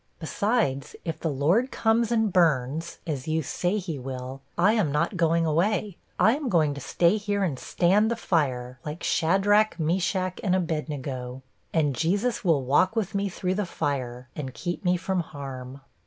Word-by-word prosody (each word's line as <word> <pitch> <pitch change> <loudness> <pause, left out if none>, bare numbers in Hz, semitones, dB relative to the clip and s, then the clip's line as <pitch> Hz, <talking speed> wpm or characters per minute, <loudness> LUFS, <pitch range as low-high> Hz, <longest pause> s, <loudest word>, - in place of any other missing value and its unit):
Besides, 175 - -1
if 165 - -3
the 165 - -1
Lord 165 - +2
comes 230 -1 +1
and 220 -4 +2
burns 160 -2 +1
as 145 -5 -4
you 160 0 0
say 180 +8 -1
he 170 -7 -4
will 130 +1 -6 0.2
I 190 +5 +4
am 205 -10 +1
not 165 +7 0
going 165 -1 +2
away; 185 +5 0 0.2
I 220 +3 +5
am 290 -3 -3
going 155 -6 +3
to 140 - -7
stay 175 +9 +2
here 205 -1 -1
and 150 -9 -1
stand 200 +5 +2
the 235 - 0
fire, 130 - -1
like 150 +2 -6
Shadrach, 195 +4 +3
Meshach, 180 +3 0
and 185 -2 +2
Abednego! 140 -7 -3 0.3
And 150 -4 +2
Jesus 200 - 0
will 160 -7 +3
walk 145 - +3
with 220 -2 -1
me 200 0 0
through 185 0 -2
the 205 +2 -1
fire, 130 -6 -3
and 135 -4 -5
keep 175 +3 -4
me 180 -1 +2
from 185 +1 -1
harm. 135 -4 -7
170 Hz, 170 wpm, -26 LUFS, 140-195 Hz, 0.3 s, I